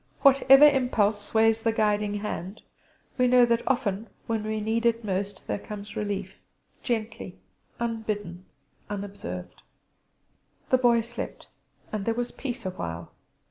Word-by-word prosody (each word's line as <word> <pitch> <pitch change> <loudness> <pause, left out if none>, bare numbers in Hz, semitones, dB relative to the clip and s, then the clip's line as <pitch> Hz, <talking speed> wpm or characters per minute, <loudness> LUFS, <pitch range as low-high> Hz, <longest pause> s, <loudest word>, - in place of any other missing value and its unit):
Whatever 275 +1 +8
impulse 230 -7 +2
sways 225 +1 +2
the 225 - +2
guiding 210 -1 +1
hand, 200 -1 -5 0.6
we 250 - +5
know 250 0 +6
that 235 0 +2
often 225 -5 0 0.2
when 225 -2 -1
we 215 0 -2
need 220 +2 -1
it 230 0 +1
most 195 0 -3
there - - -2
comes 205 0 -8
relief; 200 -2 -4 0.4
gently, 225 -5 -3 0.4
unbidden, 215 -6 -3 0.4
unobserved. 195 - -6 1.1
The 255 - +5
Boy 240 -2 +4
slept, 235 +1 -7 0.5
and 210 -2 -3
there 230 - 0
was 245 0 -2
peace 245 -5 -6
awhile. 85 - -5
220 Hz, 130 wpm, -27 LUFS, 200-235 Hz, 1.1 s, Whatever